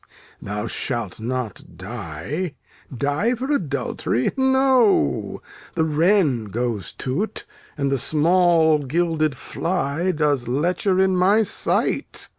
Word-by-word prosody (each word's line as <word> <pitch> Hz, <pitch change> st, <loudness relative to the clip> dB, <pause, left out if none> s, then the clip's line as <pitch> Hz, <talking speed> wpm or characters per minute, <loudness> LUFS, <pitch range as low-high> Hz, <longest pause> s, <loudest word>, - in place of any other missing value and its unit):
Thou 105 Hz, +2 st, -4 dB
shalt 115 Hz, -3 st, -4 dB
not 115 Hz, -7 st, -5 dB
die. 105 Hz, -, -5 dB, 0.4 s
Die 145 Hz, -, 0 dB
for 260 Hz, +4 st, -3 dB
adultery? 140 Hz, -, -1 dB
No. 265 Hz, -, +2 dB, 0.3 s
The 160 Hz, -, +2 dB
wren 160 Hz, -, +2 dB
goes 110 Hz, -1 st, -3 dB
to't, 155 Hz, +12 st, -3 dB, 0.3 s
and 140 Hz, -1 st, 0 dB
the 135 Hz, -, +1 dB
small 160 Hz, +1 st, +3 dB
gilded 155 Hz, 0 st, 0 dB
fly 170 Hz, -1 st, -2 dB
Does 150 Hz, -6 st, 0 dB
lecher 175 Hz, +8 st, +1 dB
in 190 Hz, 0 st, +3 dB
my 195 Hz, +5 st, +4 dB
sight. -, -, 0 dB
150 Hz, 105 wpm, -22 LUFS, 125-185 Hz, 0.4 s, my